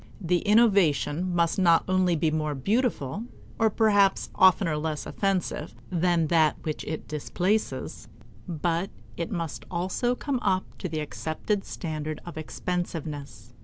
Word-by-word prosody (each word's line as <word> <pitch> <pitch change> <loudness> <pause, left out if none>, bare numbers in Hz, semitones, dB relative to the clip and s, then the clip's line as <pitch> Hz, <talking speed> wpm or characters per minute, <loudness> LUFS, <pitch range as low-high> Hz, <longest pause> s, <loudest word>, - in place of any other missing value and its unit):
The 175 -2 +1
innovation 185 -6 +3
must 170 +2 +2
not 170 -3 +5
only 185 -2 +3
be 155 0 +1
more 155 -1 -1
beautiful, 205 - 0 0.3
or 225 -1 +4
perhaps 205 -3 +3
oftener 185 -3 +4
less 150 -1 -3
offensive, 190 -5 -1 0.2
than 175 -1 +2
that 160 -2 +4
which 155 -1 -3
it 155 0 -5
displaces, 180 +8 -2 0.4
but 170 +2 -1 0.3
it 170 - -3
must 165 - -4
also 190 +8 0
come 275 0 -2
up 190 -5 +1
to 185 - -3
the 155 -1 -2
accepted 160 +7 -2
standard 155 -2 -4
of 175 - -8
expensiveness. 155 - -5
170 Hz, 130 wpm, -27 LUFS, 155-195 Hz, 0.4 s, not